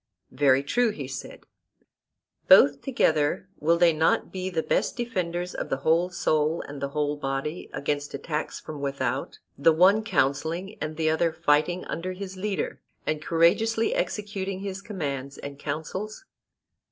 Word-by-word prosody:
Very 135 Hz, 0 st, +3 dB
true, 240 Hz, +11 st, +2 dB
he 145 Hz, -11 st, -5 dB
said. 130 Hz, -1 st, -7 dB, 1.1 s
Both 140 Hz, 0 st, +7 dB
together 160 Hz, -, +1 dB
will 165 Hz, +3 st, +3 dB
they 170 Hz, -1 st, +5 dB
not 160 Hz, +1 st, +2 dB
be 185 Hz, 0 st, -3 dB
the 165 Hz, -3 st, -1 dB
best -, -, 0 dB
defenders 180 Hz, -7 st, -2 dB
of -, -, -4 dB
the 135 Hz, -, 0 dB
whole 170 Hz, +3 st, +3 dB
soul 155 Hz, -2 st, +1 dB
and 145 Hz, -1 st, -8 dB
the 140 Hz, -, 0 dB
whole 150 Hz, 0 st, -1 dB
body 135 Hz, +4 st, -3 dB
against 145 Hz, 0 st, -2 dB
attacks 150 Hz, +2 st, -3 dB
from 150 Hz, -2 st, -8 dB
without; 135 Hz, -2 st, -2 dB, 0.2 s
the 165 Hz, -, +6 dB
one 190 Hz, +7 st, +5 dB
counselling, 165 Hz, +2 st, 0 dB
and 155 Hz, 0 st, -4 dB
the 155 Hz, -1 st, +2 dB
other 165 Hz, +1 st, +2 dB
fighting 155 Hz, +5 st, +1 dB
under 185 Hz, +3 st, -4 dB
his 190 Hz, 0 st, -7 dB
leader, 195 Hz, +1 st, -3 dB, 0.2 s
and 155 Hz, -1 st, -1 dB
courageously 195 Hz, +8 st, +2 dB
executing 195 Hz, -2 st, -3 dB
his 195 Hz, -1 st, -5 dB
commands 140 Hz, -, -4 dB
and 140 Hz, 0 st, -8 dB
counsels? 185 Hz, -, -5 dB
160 Hz, 150 wpm, -26 LUFS, 145-185 Hz, 1.1 s, Both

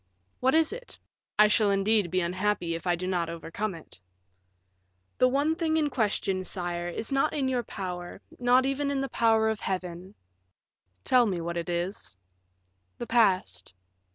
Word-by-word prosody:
"What 260 Hz, +3 st, +2 dB
is 320 Hz, +4 st, +3 dB
it? -, -, -9 dB, 0.4 s
I 210 Hz, 0 st, +7 dB
shall 210 Hz, 0 st, +3 dB
indeed 200 Hz, -1 st, +2 dB
be 185 Hz, +2 st, +1 dB
unhappy 185 Hz, 0 st, -1 dB
if 165 Hz, +2 st, -5 dB
I 175 Hz, -, +3 dB
do 180 Hz, +2 st, -5 dB
not 175 Hz, -3 st, -1 dB
overcome 170 Hz, +4 st, -4 dB
it." 160 Hz, -, -12 dB, 1.2 s
"That 255 Hz, -, +6 dB
one 285 Hz, +5 st, +2 dB
thing 320 Hz, -1 st, 0 dB
in 300 Hz, -2 st, +1 dB
question, 200 Hz, -5 st, 0 dB
sire, 175 Hz, -2 st, -3 dB
is 220 Hz, +8 st, -5 dB
not 275 Hz, +2 st, +2 dB
in 275 Hz, -3 st, 0 dB
your 255 Hz, -2 st, 0 dB
power, 180 Hz, -5 st, -6 dB, 0.2 s
not 250 Hz, +1 st, +4 dB
even 275 Hz, +1 st, -1 dB
in 275 Hz, -1 st, -1 dB
the 270 Hz, -, -3 dB
power 225 Hz, -2 st, +3 dB
of 220 Hz, -1 st, -1 dB
Heaven." 185 Hz, +1 st, -4 dB, 0.9 s
"Tell 250 Hz, -2 st, +4 dB
me 185 Hz, -4 st, -1 dB
what 170 Hz, +1 st, -4 dB
it 170 Hz, 0 st, -3 dB
is." 175 Hz, -, -3 dB, 0.8 s
"The -, -, -5 dB
past." 185 Hz, -, +1 dB
205 Hz, 165 wpm, -28 LUFS, 175-255 Hz, 1.2 s, I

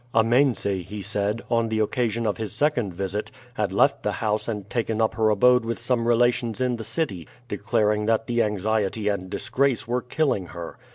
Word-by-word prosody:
Amense, 120 Hz, +3 st, +3 dB, 0.2 s
he 105 Hz, -1 st, -6 dB
said, 105 Hz, +2 st, -1 dB
on 115 Hz, -1 st, +2 dB
the 110 Hz, -, -1 dB
occasion 115 Hz, +1 st, 0 dB
of 105 Hz, -, 0 dB
his 110 Hz, -1 st, -4 dB
second 120 Hz, -5 st, +1 dB
visit, 100 Hz, +2 st, -3 dB, 0.2 s
had 105 Hz, -5 st, -1 dB
left 100 Hz, -, +3 dB
the -, -, -1 dB
house 105 Hz, -1 st, -1 dB
and 105 Hz, -4 st, -4 dB
taken 115 Hz, -1 st, -2 dB
up 110 Hz, -1 st, +2 dB
her 110 Hz, -1 st, +2 dB
abode 125 Hz, +4 st, +4 dB
with 115 Hz, 0 st, -3 dB
some 120 Hz, -1 st, 0 dB
relations 120 Hz, -1 st, +2 dB
in 125 Hz, -2 st, 0 dB
the 115 Hz, -, -6 dB
city, 105 Hz, -, -2 dB, 0.2 s
declaring 105 Hz, 0 st, 0 dB
that 115 Hz, 0 st, +2 dB
the 120 Hz, 0 st, +1 dB
anxiety 105 Hz, 0 st, 0 dB
and 95 Hz, -2 st, -3 dB
disgrace 115 Hz, +7 st, 0 dB
were 125 Hz, +1 st, 0 dB
killing 125 Hz, -, -1 dB
her. 85 Hz, 0 st, -8 dB
110 Hz, 185 wpm, -24 LUFS, 105-120 Hz, 0.2 s, abode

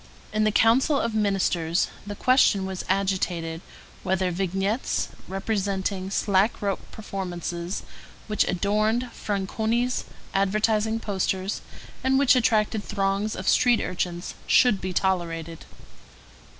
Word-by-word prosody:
In 215 Hz, 0 st, +2 dB
the 215 Hz, -, +3 dB
Council 260 Hz, +7 st, +4 dB
of 230 Hz, -1 st, -1 dB
Ministers 190 Hz, -5 st, +1 dB, 0.2 s
the 205 Hz, -, -4 dB
question 230 Hz, -5 st, +4 dB
was 190 Hz, -1 st, -4 dB
agitated 180 Hz, -4 st, -1 dB, 0.4 s
whether 185 Hz, -1 st, 0 dB
vignettes 195 Hz, +6 st, -1 dB, 0.2 s
representing 195 Hz, -1 st, -2 dB
slack 200 Hz, +2 st, +2 dB
rope 200 Hz, -2 st, -1 dB
performances, 180 Hz, -3 st, -4 dB, 0.4 s
which 210 Hz, -1 st, +2 dB
adorned 215 Hz, +6 st, 0 dB
Franconi's 220 Hz, +5 st, -1 dB, 0.3 s
advertising 215 Hz, +3 st, +1 dB
posters, 190 Hz, -2 st, -2 dB, 0.4 s
and 265 Hz, 0 st, +3 dB
which 275 Hz, 0 st, +5 dB
attracted 220 Hz, -3 st, +2 dB
throngs 200 Hz, +1 st, -1 dB
of 185 Hz, -, -6 dB
street 245 Hz, -2 st, +4 dB
urchins, 175 Hz, -1 st, -3 dB
should 230 Hz, -6 st, +4 dB
be 185 Hz, -, -3 dB
tolerated. 170 Hz, -3 st, -1 dB
195 Hz, 110 wpm, -25 LUFS, 185-220 Hz, 0.4 s, which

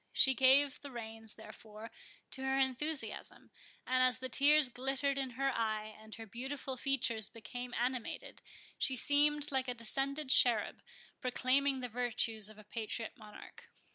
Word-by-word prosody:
She 265 Hz, -, +5 dB
gave 265 Hz, +2 st, +4 dB
the 285 Hz, -, -8 dB
reins, 225 Hz, -3 st, -8 dB
therefore, 220 Hz, 0 st, -11 dB, 0.4 s
to 265 Hz, -, -3 dB
her 265 Hz, 0 st, 0 dB
enthusiasm; 270 Hz, +3 st, -2 dB, 0.3 s
and 255 Hz, 0 st, +1 dB
as 255 Hz, -1 st, +4 dB
the 260 Hz, 0 st, -6 dB
tears 290 Hz, +3 st, +5 dB
glittered 270 Hz, +2 st, -1 dB
in 265 Hz, -2 st, -2 dB
her 275 Hz, 0 st, +1 dB
eye, 215 Hz, -1 st, -2 dB
and 220 Hz, 0 st, -11 dB
her 225 Hz, -, -9 dB
beautiful 265 Hz, +5 st, -5 dB
features 235 Hz, -5 st, -1 dB
became 245 Hz, +3 st, -8 dB
animated, 245 Hz, 0 st, -3 dB, 0.4 s
she 265 Hz, -, +2 dB
seemed 290 Hz, +3 st, +2 dB
like 265 Hz, -1 st, 0 dB
a 250 Hz, -, -2 dB
descended 270 Hz, +5 st, -1 dB
cherub 245 Hz, -7 st, +5 dB, 0.4 s
proclaiming 260 Hz, +2 st, +1 dB
the 250 Hz, -, -3 dB
virtues 230 Hz, -3 st, -1 dB
of 215 Hz, -, -14 dB
a 215 Hz, -, -13 dB
patriot 220 Hz, +1 st, -5 dB
monarch. 215 Hz, -5 st, -13 dB
255 Hz, 150 wpm, -34 LUFS, 225-270 Hz, 0.4 s, She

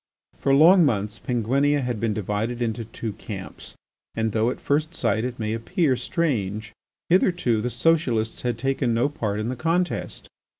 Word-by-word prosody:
For 135 Hz, -, +1 dB
long 170 Hz, +6 st, +7 dB
months 105 Hz, -5 st, 0 dB
Penguinia 135 Hz, +5 st, +1 dB
had 125 Hz, -4 st, -2 dB
been 115 Hz, 0 st, 0 dB
divided 105 Hz, +3 st, -2 dB
into 115 Hz, -1 st, -2 dB
two 115 Hz, -1 st, -6 dB
camps 95 Hz, -2 st, -8 dB, 0.4 s
and, 110 Hz, -1 st, 0 dB
though 110 Hz, +2 st, +1 dB
at -, -, -4 dB
first 155 Hz, +3 st, 0 dB
sight 110 Hz, -6 st, 0 dB
it 125 Hz, -1 st, -4 dB
may 110 Hz, -1 st, -2 dB
appear 135 Hz, -, +1 dB
strange, 115 Hz, -, -2 dB, 0.4 s
hitherto 175 Hz, -, +2 dB
the 125 Hz, -, -1 dB
socialists 125 Hz, -8 st, +1 dB
had 120 Hz, -2 st, -1 dB
taken 130 Hz, -1 st, 0 dB
no 120 Hz, +5 st, +2 dB
part 105 Hz, -8 st, -3 dB
in 110 Hz, +2 st, -2 dB
the 130 Hz, -, -2 dB
contest. 165 Hz, +6 st, -1 dB
120 Hz, 165 wpm, -24 LUFS, 110-145 Hz, 0.4 s, long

